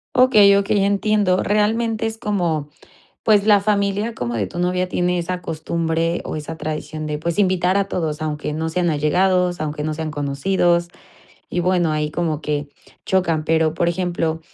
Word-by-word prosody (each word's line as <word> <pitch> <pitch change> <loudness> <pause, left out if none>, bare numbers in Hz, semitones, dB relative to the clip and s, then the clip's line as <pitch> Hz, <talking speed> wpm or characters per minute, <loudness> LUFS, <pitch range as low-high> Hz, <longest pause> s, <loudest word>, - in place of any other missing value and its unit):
Okey, 215 -6 +6
okey, 200 0 +1
entiendo. 200 -2 +2
Realmente 220 +2 +1
es 225 0 -5
como 170 -9 -1 0.5
pues, 210 -2 +4
la 205 -2 +6
familia 205 +2 0
como 120 -1 -3
de 105 -4 -1
tu 95 - -9
novia 180 +1 0
tiene 180 0 0
esa 180 +1 -3
costumbre 165 +1 -2
o - - -5
esa 155 +2 -6
tradición 155 0 -5
de 150 0 -2
pues 170 +4 -2
invitar 185 -2 +2
a 200 -1 0
todos, 155 -3 -2
aunque 150 -1 -3
no 160 +1 -2
sean 175 +1 0
allegados, 180 +4 +1
aunque 150 -1 -3
no 155 0 -2
sean 160 0 -4
conocidos 170 +5 +1 0.6
y 175 - -1
bueno, 175 -3 +1
ahí 150 0 -1
como 160 -2 -2
que 145 -1 -3 0.4
chocan. 170 -5 +1
Pero, 160 0 +2
por 170 - +1
ejemplo, 170 -2 -1
175 Hz, 170 wpm, -20 LUFS, 155-195 Hz, 0.6 s, Okey